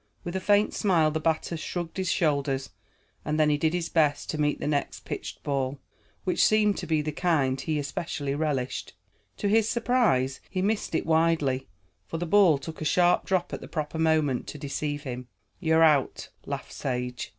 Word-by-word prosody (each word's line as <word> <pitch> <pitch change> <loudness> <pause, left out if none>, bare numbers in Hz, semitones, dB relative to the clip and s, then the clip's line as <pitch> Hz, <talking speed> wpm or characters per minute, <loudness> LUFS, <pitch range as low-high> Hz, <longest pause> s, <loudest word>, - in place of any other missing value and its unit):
With 175 +1 -5
a - - +1
faint 205 +2 +3
smile, 165 -6 +2
the 160 - -1
batter 160 +1 0
shrugged 170 +2 -5
his 185 -2 0
shoulders, 140 -4 0 0.5
and 155 +1 -1
then 150 -1 +4
he 145 - +2
did 160 +2 +1
his 170 -1 -1
best 150 -4 +1
to 155 - -2
meet 145 0 +1
the - - -4
next 145 -1 -1
pitched - - -6
ball, 135 -1 -1 0.4
which 185 - +2
seemed 210 -1 +4
to 175 - -6
be 155 -2 +1
the 155 - -2
kind 145 -5 +1
he 155 -2 -1
especially 145 -1 -3
relished. 140 -4 -2 0.4
To 205 - -1
his 220 +1 +3
surprise, 225 - +1
he 185 - -3
missed 205 -4 -1
it - - 0
widely, 160 -5 +2 0.4
for 165 - -4
the 175 - -2
ball 180 -4 +5
took 160 +4 -8
a - - -1
sharp 175 +3 +3
drop 185 -2 0
at - - -4
the - - -8
proper 155 0 -4
moment 155 -5 +2
to - - -7
deceive 145 +1 -3
him. 125 -3 -6 0.3
"You're 160 0 +3
out," 150 -5 +2 0.2
laughed - - -5
Sage. 125 -1 -3
155 Hz, 190 wpm, -27 LUFS, 145-175 Hz, 0.5 s, ball